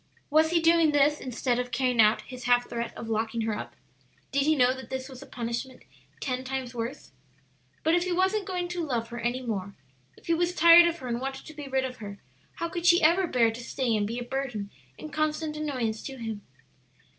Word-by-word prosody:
Was 315 +1 +5
he 340 0 +3
doing 330 -2 +4
this 290 +1 +3
instead 250 -1 -1
of 250 0 -3
carrying 250 -1 +2
out 215 +1 +4
his 250 -2 -9
half 245 0 +3
threat 235 0 -4
of 230 - -6
locking 225 +1 -1
her 220 -1 -1
up? - - -7 0.6
Did 280 +1 +1
he 315 - +4
know 255 -2 +4
that 260 0 -10
this 260 0 -4
was 260 -2 -11
a 280 - -11
punishment 240 +2 -5 0.4
ten 255 -1 -2
times 260 -1 -4
worse? 240 +4 -5 0.7
But 320 - +3
if 350 +1 +2
he 365 - -2
wasn't 380 +3 +1
going 360 -2 -2
to 355 -1 -3
love 235 -6 -2
her 240 0 -6
any 240 +3 -2
more, 200 -4 -4 0.4
if - - -19
he 335 - +2
was 350 +1 0
tired 340 +1 +8
of 340 0 -1
her 260 - -8
and 240 0 -2
wanted 270 0 -5
to 310 - -10
be 295 -2 -8
rid 265 0 0
of 255 -1 -6
her, 200 -2 -8 0.4
how 335 - -2
could 345 0 -2
she 345 0 +6
ever 345 +4 +4
bear 235 -6 +3
to 235 +2 -8
stay 240 -2 -1
and 205 -1 0
be 230 +3 -4
a 245 - -3
burden 245 -6 -4 0.3
and 305 - -9
constant 310 0 -1
annoyance 255 -8 -2
to 270 -1 -7
him? 225 -3 -5
260 Hz, 225 wpm, -27 LUFS, 235-310 Hz, 0.7 s, tired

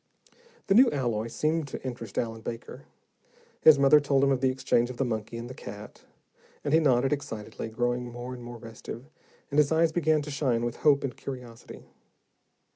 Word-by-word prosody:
The 195 - +2
new 250 +5 +7
alloy 120 -6 -1
seemed 155 +5 -1
to 135 - -8
interest 115 -5 -6
Allen 115 -1 -2
Baker. 115 +1 -7 0.8
His 155 -2 +8
mother 140 +2 +6
told 140 -2 +2
him 140 - +4
of 130 -2 +1
the 130 - +3
exchange 130 -2 +1
of 125 - -7
the 135 - 0
monkey 110 -1 -4
and 115 +1 -6
the 130 - -8
cat, 105 -4 -10 0.6
and 145 - -1
he 160 - +6
nodded 135 -3 +3
excitedly, 115 -6 -5
growing 120 +1 -2
more 120 +1 -7
and 125 -1 -9
more 120 0 -8
restive, 115 +1 -9 0.5
and 145 - +2
his 150 0 +3
eyes 160 0 +3
began 155 -2 +2
to 150 - -7
shine 125 -5 0
with 120 0 -4
hope 145 -2 +3
and 135 -3 -3
curiosity. 125 -3 -9
130 Hz, 190 wpm, -28 LUFS, 120-145 Hz, 0.8 s, His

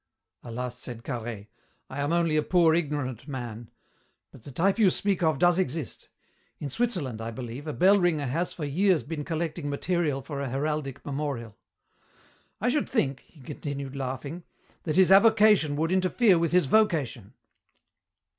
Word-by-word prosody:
"Alas," 125 +1 -5
said 120 -2 -8
Carhaix, 115 -5 -5 0.4
"I 135 - -7
am 145 +2 0
only 170 -2 +2
a 155 - +3
poor 170 0 +3
ignorant 145 -6 -2
man. 120 -5 -6 0.6
But 130 - -15
the 140 - -11
type 190 - +1
you 205 -4 +6
speak 195 0 0
of 160 -4 +2
does 175 +4 +3
exist. 160 -6 -3 0.5
In 140 - -6
Switzerland, 165 - -2
I 115 - -4
believe, 125 +4 -7
a 150 - -3
bell 195 +5 +5
ringer 165 -5 +1
has 165 +8 -1
for 155 - -5
years 180 +4 +2
been 155 -1 -5
collecting 160 -1 -3
material 150 -2 -1
for 140 0 -5
a 140 - -3
heraldic 140 0 -3
memorial. 135 -6 -4 1.0
I 240 - +1
should 290 +3 0
think," 140 - 0
he 155 - -19
continued, 140 0 -6
laughing, 135 +5 -5 0.4
"that 155 - -1
his 190 0 +5
avocation 210 -6 +5
would 160 +3 0
interfere 185 +1 +3
with 165 -1 0
his 180 -2 +4
vocation." 145 - +1
150 Hz, 160 wpm, -27 LUFS, 130-175 Hz, 1.0 s, you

